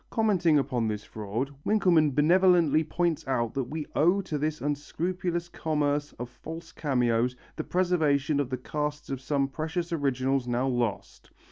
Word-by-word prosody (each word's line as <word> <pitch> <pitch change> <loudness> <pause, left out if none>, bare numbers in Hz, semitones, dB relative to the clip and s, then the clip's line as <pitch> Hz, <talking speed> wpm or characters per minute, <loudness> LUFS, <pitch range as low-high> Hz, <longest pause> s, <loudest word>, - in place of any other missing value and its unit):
Commenting 190 -9 +3
upon 125 -5 0
this 105 -1 -3
fraud, 110 +6 -4
Winkelmann 170 -9 +3
benevolently 170 -1 +4
points 165 -1 -1
out 120 -4 0
that 135 -2 -1
we 150 +4 -5
owe 175 +6 +4
to 155 -6 -4
this 155 +1 -1
unscrupulous 170 +4 -2
commerce 150 -3 -1
of 120 - -6
false 160 +7 -9
cameos 125 -3 +1 0.2
the - - -3
preservation 155 -5 +1
of 140 -3 -1
the 130 - -2
casts 150 +3 -4
of 135 -1 -3
some 140 0 0
precious 160 +4 -3
originals 135 -3 0
now 125 +2 0
lost. 120 -5 -2
150 Hz, 150 wpm, -28 LUFS, 130-165 Hz, 0.2 s, benevolently